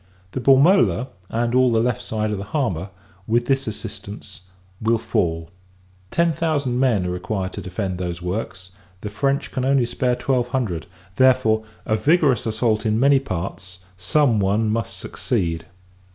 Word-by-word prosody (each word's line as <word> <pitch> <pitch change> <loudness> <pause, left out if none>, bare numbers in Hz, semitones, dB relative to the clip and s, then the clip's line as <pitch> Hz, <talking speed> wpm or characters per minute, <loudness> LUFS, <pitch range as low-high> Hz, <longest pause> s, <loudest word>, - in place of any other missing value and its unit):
The 130 - -4
Bormola, 135 - +4 0.2
and 115 +1 -1
all 130 -1 +4
the 115 - +3
left 120 0 0
side 110 -1 -2
of 105 - -2
the - - -4
harbour, 100 - -2 0.4
with 120 +2 +2
this 135 0 0
assistance, 100 -2 -8 0.4
will 115 +1 +2
fall. 80 -6 -1 0.6
Ten 170 +5 +2
thousand 145 -5 0
men 115 -8 +2
are 90 - -1
required 95 +1 -3
to - - -6
defend 95 0 -4
those 85 -2 -3
works, 90 0 -5 0.3
the 105 - -5
French 140 +5 -1
can 130 - -2
only 135 -1 +3
spare 125 +1 0
twelve 125 0 0
hundred; 115 - -2 0.3
therefore, 125 -4 +4 0.2
a 110 - +1
vigorous 145 -5 +3
assault 110 0 +1
in 110 -1 +1
many 140 +1 +5
parts, 95 -4 -5 0.2
some 115 - +2
one 105 +3 +1
must 115 -2 -2
succeed. 80 -1 -2
110 Hz, 155 wpm, -22 LUFS, 95-130 Hz, 0.6 s, many